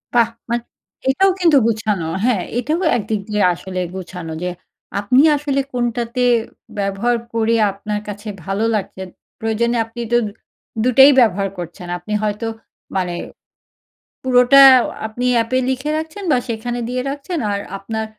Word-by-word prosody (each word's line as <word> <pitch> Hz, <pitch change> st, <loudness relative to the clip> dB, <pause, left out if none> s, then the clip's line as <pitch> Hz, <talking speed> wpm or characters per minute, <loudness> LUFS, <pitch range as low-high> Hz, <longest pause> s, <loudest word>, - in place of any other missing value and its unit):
বাহ! 235 Hz, -2 st, +5 dB, 0.2 s
মা 235 Hz, -, +1 dB, 0.5 s
এটাও 385 Hz, +8 st, +4 dB
কিন্তু 335 Hz, -6 st, +5 dB
গোছানো। 215 Hz, -6 st, -1 dB, 0.2 s
হ্যাঁ, 230 Hz, -8 st, +2 dB, 0.2 s
এটাও 305 Hz, +7 st, -1 dB, 0.2 s
একদিক 215 Hz, -1 st, -2 dB
দিয়ে 210 Hz, -1 st, +1 dB
আসলে 185 Hz, +1 st, -5 dB
গুছানো। 180 Hz, -3 st, -7 dB
যে 180 Hz, -, -1 dB, 0.5 s
আপনি 250 Hz, +7 st, +4 dB
আসলে 280 Hz, -1 st, 0 dB
কোনটাতে 240 Hz, 0 st, -1 dB, 0.6 s
ব্যবহার 200 Hz, +5 st, 0 dB, 0.2 s
করে 230 Hz, 0 st, +2 dB, 0.2 s
আপনার 210 Hz, +1 st, -4 dB
কাছে 205 Hz, +1 st, -7 dB, 0.2 s
ভালো 195 Hz, +3 st, -1 dB
লাগছে। 190 Hz, -2 st, -4 dB, 0.4 s
প্রয়োজনে 235 Hz, +1 st, 0 dB
আপনি 230 Hz, +1 st, -8 dB
তো -, -, +6 dB, 0.7 s
দুটোই 265 Hz, +3 st, +7 dB
ব্যবহার 200 Hz, -4 st, +3 dB
করছেন। 175 Hz, +1 st, -7 dB
আপনি 195 Hz, +5 st, -6 dB
হয়তো 210 Hz, +2 st, -2 dB, 0.5 s
মানে 180 Hz, -2 st, -1 dB, 1.1 s
পুরোটা 255 Hz, +2 st, +6 dB, 0.5 s
আপনি 240 Hz, +3 st, -4 dB
অ্যাপে 235 Hz, +3 st, +1 dB
লিখে 265 Hz, +3 st, -2 dB
রাখছেন 320 Hz, +6 st, -6 dB
বা 255 Hz, -, +4 dB
সেখানে 240 Hz, +1 st, -3 dB
দিয়ে 250 Hz, 0 st, -1 dB
রাখছেন 290 Hz, +5 st, -4 dB
আর 200 Hz, -, -1 dB, 0.2 s
আপনার 220 Hz, +3 st, -4 dB
230 Hz, 135 wpm, -19 LUFS, 200-250 Hz, 1.1 s, দুটোই